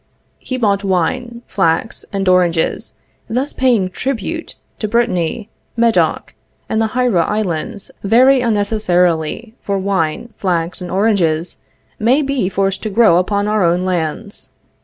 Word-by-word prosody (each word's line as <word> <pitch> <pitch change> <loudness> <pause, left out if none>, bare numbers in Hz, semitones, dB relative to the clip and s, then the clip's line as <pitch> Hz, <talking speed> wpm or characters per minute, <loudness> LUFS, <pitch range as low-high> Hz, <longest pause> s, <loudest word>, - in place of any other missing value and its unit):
He 255 - -4
bought 205 -4 +1
wine, 235 +6 -1
flax, 190 +4 -1
and 195 -1 -2
oranges, 180 -3 +1 0.3
thus 255 +5 -1
paying 235 -8 +2
tribute 275 - -4 0.2
to 215 - -1
Brittany, 220 -2 0 0.3
Medoc, 230 -1 +1 0.3
and 220 - 0
the 220 +1 -2
Hiera 245 -9 +3
islands 205 0 -3
very 255 +6 +5
unnecessarily, 205 -3 0
for 200 -1 -1
wine, 195 +3 -1
flax 175 -1 -1
and 180 - -5
oranges 185 -5 +1 0.4
may 255 +7 +3
be 270 -9 0
forced 195 0 -1
to 215 - -3
grow 210 -4 +5
upon 200 +3 0
our 210 -2 +1
own 175 +2 +2
lands. 185 +3 -3
205 Hz, 130 wpm, -17 LUFS, 180-235 Hz, 0.4 s, very